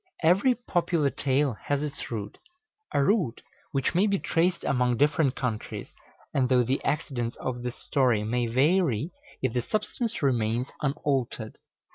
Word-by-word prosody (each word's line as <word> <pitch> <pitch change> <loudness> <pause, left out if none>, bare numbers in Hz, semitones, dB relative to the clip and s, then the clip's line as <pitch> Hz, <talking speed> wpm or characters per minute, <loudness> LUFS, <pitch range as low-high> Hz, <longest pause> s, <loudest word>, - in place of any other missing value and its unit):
Every 195 +10 +4
popular 175 - 0
tale 135 0 +1
has 145 0 0
its 145 -2 -5
root, 105 -3 -5 0.5
a 140 - +2
root 170 - +1 0.3
which 135 -2 0
may 190 +5 +4
be 200 -1 +2
traced 175 0 +1
among 125 -2 +1
different 145 -1 +3
countries, 120 -5 -4 0.4
and 130 -2 +2
though 125 -1 +5
the 130 +3 -1
accidents 130 -5 -1
of 125 -1 -4
the 125 0 -2
story 125 -4 +1
may 120 +2 0
vary, 145 - +2 0.3
yet 130 -3 +1
the 125 - +1
substance 225 - -2
remains 120 -1 +1
unaltered. 135 -5 -1
135 Hz, 145 wpm, -27 LUFS, 125-160 Hz, 0.5 s, though